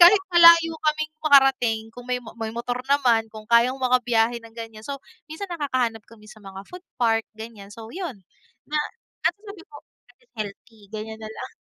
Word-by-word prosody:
kahit 380 +3 +8
malayo 335 -1 +8 0.2
kaming 310 0 0
makarating 270 -6 +4
kung 245 +1 -12
may 250 - +1 0.2
may 225 -1 -3
motor 245 +1 -3
naman, 245 -6 +3
kung 215 0 -11
kayang 235 +3 +4
maka-biyahe 245 -2 +2
ng 230 0 -15
ganiyan 225 -1 -9
so, 280 -1 -4 0.3
minsan 355 +5 -7
nakakahanap 255 -8 -1
kami 220 -2 -17
sa 215 - -14
mga 195 -1 -10
food 360 +1 -11
park 225 -2 +1
ganiyan 220 -3 -10
so 225 0 -10
yun. 320 - -6 0.5
Na 305 - +1 0.5
at - - -3
sabi 405 -3 -12
ko, 290 - -13 0.3
"At - - -77
least 485 - -32
healthy," 210 +1 -8
ganiyan 220 +1 -6
na 215 - -7
lang. 220 - -9
240 Hz, 180 wpm, -24 LUFS, 225-300 Hz, 0.5 s, kahit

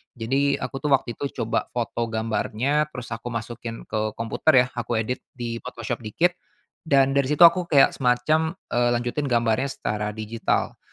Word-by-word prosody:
Jadi 135 +5 +1
aku 130 +1 -5
tuh 150 - -3
waktu 130 -2 -4
itu 140 - -1 0.2
coba 115 - -1
foto 120 -1 -1
gambarnya 115 +6 0
terus 125 0 -7
aku 115 +2 -5
masukin 115 0 -5
ke 110 -1 -3
komputer 125 +4 +3
yah, 125 - -7
aku 120 -1 -3
edit 125 +3 -3 0.2
di 115 -2 -4
Photoshop 120 +1 -5
dikit 140 +11 +1 0.6
dan 135 -2 +4
dari 140 -1 +2
situ 150 +4 +4
aku 170 +1 +6
kayak 140 -3 +5
semacam, 150 +7 +1 0.2
eee, 120 0 +2
lanjutin 120 +4 -2
gambarnya 120 +2 +1
secara 105 -5 -3
digital. 110 +1 -2
120 Hz, 165 wpm, -24 LUFS, 115-140 Hz, 0.6 s, aku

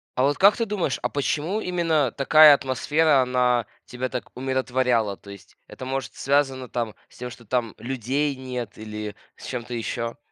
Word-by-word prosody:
А 130 - +2
вот 145 +1 +2
как 200 +2 +6
ты 230 - -1
думаешь, 200 -9 -1
а - - -1
почему 155 +8 -1
именно 165 - +1
такая 150 +3 +7
атмосфера, 140 +2 +2
она 125 -2 +2 0.2
тебя 125 +1 -4
так 125 -1 -6
умиротворяла? 125 -5 0
То 100 - -16
есть 100 -1 -13
это, - - -10
может, 135 0 -4
связано 135 -2 0
там 115 -3 -3
с - - -19
тем, 125 0 -5
что 120 - -13
там 120 0 -1
людей 135 +4 -1
нет 125 -2 -6
или 105 -1 -6 0.2
с - - -12
чем-то 125 -1 -5
ещё? 115 0 -3
130 Hz, 175 wpm, -24 LUFS, 120-145 Hz, 0.2 s, такая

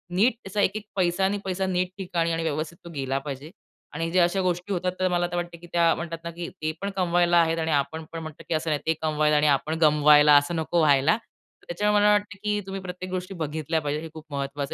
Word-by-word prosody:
नीट 220 +7 +4
त्याचा 205 +2 -2
1-1 210 +2 0
पैसा 185 0 +1
आणि 200 +2 0
पैसा 190 0 -1
नीट 180 -1 0
ठिकाणी 175 -3 -1
आणि 165 0 -1
व्यवस्थित 160 +1 -3
तो - - -8
गेला 135 -1 -1
पाहिजे 140 +1 -7 0.4
आणि 165 +2 -2
ज्या 180 -1 +4
अशा 175 +3 +1
गोष्टी 180 +2 -1
होतात. 180 0 -1
तर 185 - +2
मला 175 -1 +1
वाटतं, 175 -1 -4
की 175 +1 -14
त्या 170 -1 +4
म्हणतात 170 0 -5
ना, 170 - -5
की 170 0 -6
"ते 155 - 0
पण 200 - -2
कमवायला 175 -1 +3
आहेत." 165 0 +1
आणि 160 0 -1
आपण 150 +2 -1
म्हणतो 155 -2 -7
की - - 0
"असं 160 +1 -1
नाही 150 -2 0
ते 160 - +4
कमवायला 155 -1 +2
आणि 150 - +3
आपण 150 +3 +1
गमवायला 150 -1 +6
असं 145 +4 +1
नको 165 +1 0
व्हायला." 150 +5 +4 0.5
त्याच्यामुळे 205 +4 +1
मला 210 - +6
वाटतं 205 0 0
की 210 0 0
तुम्ही 195 0 -5
प्रत्येक 185 0 -7
गोष्टी 185 +1 -4
बघितल्या 160 0 -2
पाहिजेत. 150 0 -2
हे 165 - -7
खूप 160 -1 -10
महत्त्वाचं 140 0 -3
170 Hz, 230 wpm, -25 LUFS, 155-185 Hz, 0.5 s, गमवायला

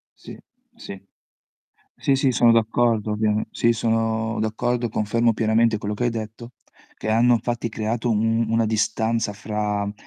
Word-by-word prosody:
Sì, - - -11 0.4
sì. 100 - -9 1.0
Sì, 140 - +2
sì, 135 -1 +2
sono 120 -1 +4
d'accordo, 115 -1 +1
ovviame 105 0 0
sì, 115 - +2
sono 115 0 -1
d'accordo, 120 +2 -1
confermo 115 +3 +1
pienamente 110 +1 +2
quello 105 0 -4
che 120 +4 -2
hai 120 - +2
detto; 115 +2 -7 0.4
che - - -6
hanno 120 +3 +4
infatti 120 0 -2
creato 115 +2 -2
u - - +2 0.4
una 115 0 +2
distanza 110 0 0
fra 105 0 -3
ehm, 100 0 -4
115 Hz, 150 wpm, -22 LUFS, 110-115 Hz, 1.0 s, sono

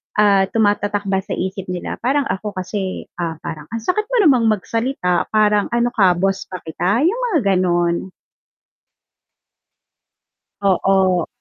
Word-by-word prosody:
ah, 200 -2 +4
tumatatak 205 -1 +1
ba 190 - +2
sa - - -11
isip 190 0 -4
nila," 180 - -4
parang 280 +3 +2
ako 205 +2 -4
kasi, 190 +1 -4 0.2
ah, 165 -2 -2
parang, 150 -2 -7
"Ang 230 - -2
sakit 395 - 0
mo - - +1
namang 255 -7 +4
magsalita, 215 -3 -1
parang 210 -1 +3
ano 240 0 +2
ka 190 -4 +5
boss 195 +1 0
ba 185 -1 -6
kita?" 185 - 0
Yung 460 +7 0
mga 325 - +3 0.2
gano'n." 175 0 0 2.5
Oo. 190 -2 +2
195 Hz, 135 wpm, -19 LUFS, 185-225 Hz, 2.5 s, ka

